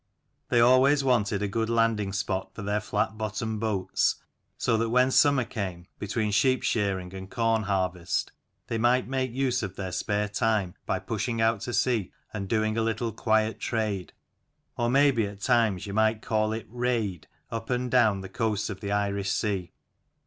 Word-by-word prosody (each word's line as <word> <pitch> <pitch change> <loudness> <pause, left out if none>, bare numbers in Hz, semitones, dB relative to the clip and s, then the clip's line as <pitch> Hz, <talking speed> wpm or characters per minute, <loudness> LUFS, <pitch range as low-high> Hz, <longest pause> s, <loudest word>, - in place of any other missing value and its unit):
They 120 - +3
always 130 +4 +5
wanted 105 -6 +1
a - - +1
good 110 +3 -1
landing 115 -3 +1
spot 95 -1 -3
for 105 - -6
their 105 +1 0
flat 105 +1 -2
bottomed 110 +1 -3
boats, 100 -4 +1 0.4
so 120 - +1
that 115 0 0
when 125 +2 +3
sum 145 +2 +5
mer 125 -3 +1
came, 95 -7 -5
between 105 +1 -1
sheep 130 +6 +2
shearing 95 -4 -1
and 95 0 -8
corn 115 -1 +1
harvest, 95 -4 -1 0.3
they 115 - -2
might 125 +2 +3
make 130 -1 -1
use 130 0 0
of 100 -3 -5
their 95 -2 -4
spare 105 +3 -1
time 105 -3 0
by 95 - +1
pushing 115 +4 -3
out 115 -2 +2
to 120 - -4
sea 115 -7 +1 0.2
and 100 -2 -4
doing 110 0 +1
a - - +2
little 115 +1 -1
quiet 110 0 +1
trade, 105 -5 -2 0.6
or 120 0 0
may 140 +3 +5
be 115 -5 0
at 100 0 -10
times 115 -6 +2
you 100 - -6
might 110 +1 +2
call 110 -1 +1
it 110 0 -4
"raid," 115 -9 -2 0.2
up 115 0 -5
and 125 -1 -1
down 110 -6 +4
the 95 - -7
coasts 110 +1 -1
of 95 - -7
the 100 -1 -4
Irish 100 -1 0
Sea. 95 -4 -1
110 Hz, 185 wpm, -27 LUFS, 100-115 Hz, 0.6 s, always